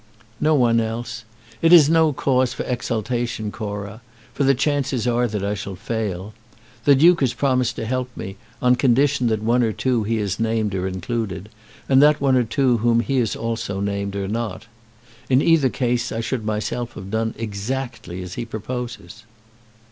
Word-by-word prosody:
"No 155 Hz, 0 st, +3 dB
one 120 Hz, -4 st, +3 dB
else. 115 Hz, 0 st, -4 dB, 0.4 s
It 165 Hz, -, +4 dB
is 165 Hz, -5 st, +9 dB
no 160 Hz, 0 st, +4 dB
case 130 Hz, -2 st, +1 dB
for -, -, -4 dB
exultation, 120 Hz, -2 st, -2 dB
Cora, 105 Hz, 0 st, -6 dB, 0.3 s
for 145 Hz, -, 0 dB
the 135 Hz, 0 st, +4 dB
chances 135 Hz, -3 st, 0 dB
are 120 Hz, 0 st, +2 dB
that 105 Hz, -3 st, -3 dB
I 100 Hz, -, 0 dB
shall 100 Hz, -1 st, -5 dB
fail. 105 Hz, -1 st, -4 dB, 0.5 s
The 145 Hz, -, +7 dB
Duke 170 Hz, +5 st, +5 dB
has 130 Hz, -3 st, +1 dB
promised 130 Hz, -3 st, +1 dB
to -, -, -4 dB
help 125 Hz, +2 st, -2 dB
me, 95 Hz, -, -6 dB, 0.3 s
on 125 Hz, 0 st, +4 dB
condition 135 Hz, +1 st, +3 dB
that 110 Hz, -1 st, 0 dB
one 120 Hz, +3 st, +3 dB
or 115 Hz, -2 st, +2 dB
two 125 Hz, +1 st, 0 dB
he 110 Hz, +2 st, -1 dB
has 105 Hz, -3 st, -2 dB
named 110 Hz, -2 st, 0 dB
are 95 Hz, 0 st, -1 dB
included, 95 Hz, +1 st, -4 dB, 0.4 s
and 135 Hz, 0 st, +5 dB
that 150 Hz, 0 st, +5 dB
one 135 Hz, -2 st, +3 dB
or 125 Hz, -, +4 dB
two 125 Hz, +1 st, +1 dB
whom 115 Hz, +1 st, +2 dB
he 135 Hz, +3 st, -1 dB
has 115 Hz, -4 st, 0 dB
also 115 Hz, -4 st, -3 dB
named 100 Hz, 0 st, -2 dB
are 100 Hz, -1 st, -2 dB
not. 110 Hz, 0 st, -4 dB, 0.6 s
In 130 Hz, 0 st, +5 dB
each 150 Hz, -4 st, +3 dB
case 125 Hz, -1 st, 0 dB
I 115 Hz, -, -3 dB
should 115 Hz, +1 st, -2 dB
myself 110 Hz, +3 st, -3 dB
have 95 Hz, -1 st, -9 dB
done 110 Hz, 0 st, -1 dB
exactly 110 Hz, -3 st, -4 dB
as 90 Hz, -1 st, -8 dB
he -, -, -4 dB
proposes." 115 Hz, 0 st, -6 dB
115 Hz, 180 wpm, -22 LUFS, 105-130 Hz, 0.6 s, is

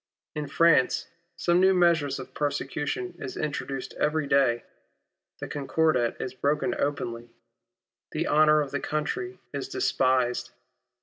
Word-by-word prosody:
In 150 Hz, -1 st, -4 dB
France, 165 Hz, -4 st, +3 dB, 0.3 s
some 175 Hz, 0 st, +2 dB
new 190 Hz, 0 st, +5 dB
measure 170 Hz, -4 st, +4 dB
of 130 Hz, -, -9 dB
persecution 145 Hz, +4 st, -2 dB
is 130 Hz, -, -6 dB
introduced 140 Hz, -3 st, -4 dB
every 150 Hz, 0 st, +1 dB
day. 135 Hz, -4 st, +2 dB, 0.8 s
The -, -, -5 dB
Concordat 140 Hz, -3 st, 0 dB
is 130 Hz, -, -4 dB
broken 150 Hz, +7 st, 0 dB
openly. 120 Hz, -4 st, -2 dB, 0.8 s
The -, -, -2 dB
honour 155 Hz, 0 st, +5 dB
of 140 Hz, -2 st, -4 dB
the 145 Hz, -, -1 dB
country 365 Hz, -, -3 dB, 0.2 s
is -, -, -4 dB
despised. 130 Hz, -, +1 dB
145 Hz, 125 wpm, -27 LUFS, 130-160 Hz, 0.8 s, new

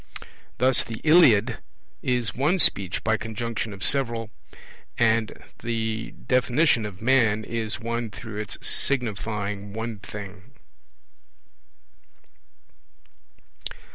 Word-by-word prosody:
Thus 130 Hz, +1 st, +3 dB
the 115 Hz, -1 st, -7 dB
Iliad 125 Hz, -9 st, +5 dB, 0.4 s
is 120 Hz, -5 st, 0 dB
one 150 Hz, +9 st, +1 dB
Speech 100 Hz, -, +2 dB
by 110 Hz, 0 st, +2 dB
conjunction 110 Hz, 0 st, -4 dB
of 100 Hz, -1 st, -8 dB
several; 115 Hz, -5 st, +2 dB, 0.7 s
and 115 Hz, -1 st, +2 dB, 0.2 s
the 115 Hz, -1 st, -2 dB, 0.2 s
definition 125 Hz, -2 st, +2 dB
of 100 Hz, 0 st, -11 dB
man 115 Hz, -4 st, +3 dB
is 110 Hz, -1 st, -3 dB
one 115 Hz, 0 st, -3 dB
through 105 Hz, +2 st, -9 dB
its 105 Hz, -1 st, -5 dB
signifying 105 Hz, -5 st, -1 dB
one 110 Hz, -1 st, -4 dB
thing. 100 Hz, +3 st, -10 dB
115 Hz, 95 wpm, -25 LUFS, 105-120 Hz, 0.7 s, Iliad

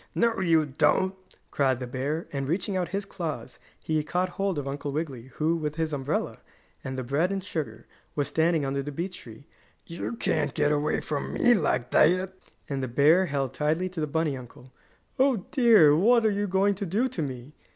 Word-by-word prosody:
"No, 230 Hz, -2 st, +2 dB
you 165 Hz, -4 st, +3 dB
don't!" 170 Hz, +6 st, +2 dB, 0.4 s
cried 135 Hz, -3 st, +2 dB
the 125 Hz, -, -4 dB
bear, 135 Hz, +6 st, -3 dB
and, 135 Hz, -1 st, -2 dB
reaching 180 Hz, +5 st, -1 dB
out 180 Hz, -2 st, 0 dB
his 195 Hz, +3 st, -3 dB
claws, 170 Hz, -6 st, -6 dB, 0.2 s
he 155 Hz, -1 st, 0 dB
caught 180 Hz, +4 st, -1 dB
hold 195 Hz, -1 st, -2 dB
of 140 Hz, -1 st, -3 dB
Uncle 145 Hz, +1 st, -4 dB
Wiggily, 140 Hz, -5 st, -4 dB
who, 160 Hz, +2 st, +1 dB
with 150 Hz, -2 st, -3 dB
his 160 Hz, -1 st, -2 dB
umbrella, 145 Hz, +2 st, -2 dB, 0.4 s
and 130 Hz, 0 st, -5 dB
the 130 Hz, -, -2 dB
bread 145 Hz, +9 st, 0 dB
and 195 Hz, -1 st, -2 dB
sugar, 130 Hz, -, -5 dB, 0.3 s
was 145 Hz, -2 st, 0 dB
standing 160 Hz, 0 st, +1 dB
under 135 Hz, 0 st, -1 dB
the 145 Hz, +2 st, -5 dB
beech 180 Hz, +6 st, -5 dB
tree. 115 Hz, +4 st, -13 dB, 0.4 s
"You 170 Hz, +6 st, -5 dB
can't 155 Hz, -8 st, -1 dB
get 150 Hz, -1 st, +2 dB
away 150 Hz, +1 st, 0 dB
from 145 Hz, -2 st, -4 dB
me 245 Hz, -, +4 dB
like 145 Hz, -, 0 dB
that," 185 Hz, +4 st, +3 dB, 0.3 s
and 140 Hz, -2 st, -3 dB
the 130 Hz, -, -2 dB
bear 150 Hz, +9 st, +4 dB
held 135 Hz, -4 st, -2 dB
tightly 160 Hz, +6 st, 0 dB
to 180 Hz, -2 st, -7 dB
the 150 Hz, -, 0 dB
bunny 155 Hz, -1 st, 0 dB
uncle. 125 Hz, 0 st, -12 dB, 0.5 s
"Oh, 260 Hz, -8 st, +2 dB
dear! 225 Hz, -, +6 dB
What 230 Hz, +7 st, +4 dB
are 215 Hz, -, +4 dB
you 205 Hz, 0 st, -1 dB
going 195 Hz, +2 st, +2 dB
to 200 Hz, 0 st, -4 dB
do 215 Hz, +9 st, +1 dB
to 210 Hz, -9 st, -4 dB
me?" 130 Hz, -1 st, -6 dB
155 Hz, 200 wpm, -27 LUFS, 140-185 Hz, 0.5 s, dear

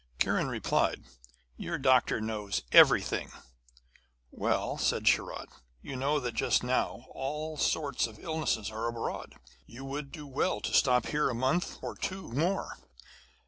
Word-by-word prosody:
Kiran -, -, +1 dB
replied: -, -, 0 dB, 0.5 s
'Your 170 Hz, -, -3 dB
doctor 130 Hz, -4 st, +3 dB
knows 105 Hz, -, -3 dB
everything!' -, -, +5 dB, 1.0 s
'Well,' -, -, -1 dB
said -, -, 0 dB
Sharat, -, -, +1 dB, 0.3 s
'you 135 Hz, -, -6 dB
know 140 Hz, +4 st, +1 dB
that 125 Hz, -3 st, -3 dB
just 110 Hz, -, +2 dB
now 125 Hz, 0 st, -1 dB
all 150 Hz, +4 st, -4 dB
sorts 145 Hz, -4 st, 0 dB
of 110 Hz, -2 st, -13 dB
illness 155 Hz, -8 st, -2 dB
are 110 Hz, +2 st, -3 dB
abroad. 115 Hz, -1 st, -4 dB, 0.3 s
You 130 Hz, +4 st, -10 dB
would 140 Hz, +1 st, -5 dB
do 150 Hz, -4 st, -8 dB
well 135 Hz, -6 st, 0 dB
to -, -, -4 dB
stop 125 Hz, -2 st, +4 dB
here 150 Hz, -1 st, +1 dB
a 125 Hz, -, -2 dB
month 130 Hz, +9 st, 0 dB
or -, -, -4 dB
two 190 Hz, -8 st, -5 dB
more.' 165 Hz, -, -1 dB
135 Hz, 140 wpm, -30 LUFS, 115-150 Hz, 1.0 s, everything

